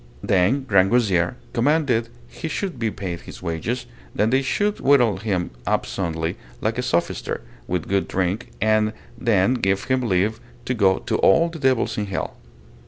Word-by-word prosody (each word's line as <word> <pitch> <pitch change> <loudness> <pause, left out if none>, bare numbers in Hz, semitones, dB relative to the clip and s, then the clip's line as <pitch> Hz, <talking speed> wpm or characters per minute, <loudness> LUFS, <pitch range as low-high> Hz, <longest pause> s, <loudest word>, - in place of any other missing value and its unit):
Then 100 +9 +2
Grangousier 100 -2 +3 0.2
commanded 125 -2 +2 0.2
he 165 - -6
should 165 -3 -3
be 115 -1 +1
paid 95 -5 -5
his - - -11
wages, 105 +9 -2 0.3
that 110 +2 +2
they 135 +1 +3
should 205 +10 0
whittle 125 -8 +4
him 95 -4 -2 0.2
up - - +1
soundly, 85 -2 -2 0.2
like 110 +3 -1
a - - +2
sophister, 125 -9 -1 0.3
with 90 -3 -2
good 100 0 +1
drink, 95 +5 -1
and 110 0 +2 0.2
then 115 -1 +2
give 95 -6 0
him 130 0 +1
leave 110 0 +1 0.3
to 125 - 0
go 95 -5 +3
to - - -1
all 165 +12 +4
the 165 -1 -8
devils 130 -5 +1
in 105 - -2
hell. 95 - -3
110 Hz, 165 wpm, -23 LUFS, 95-125 Hz, 0.3 s, whittle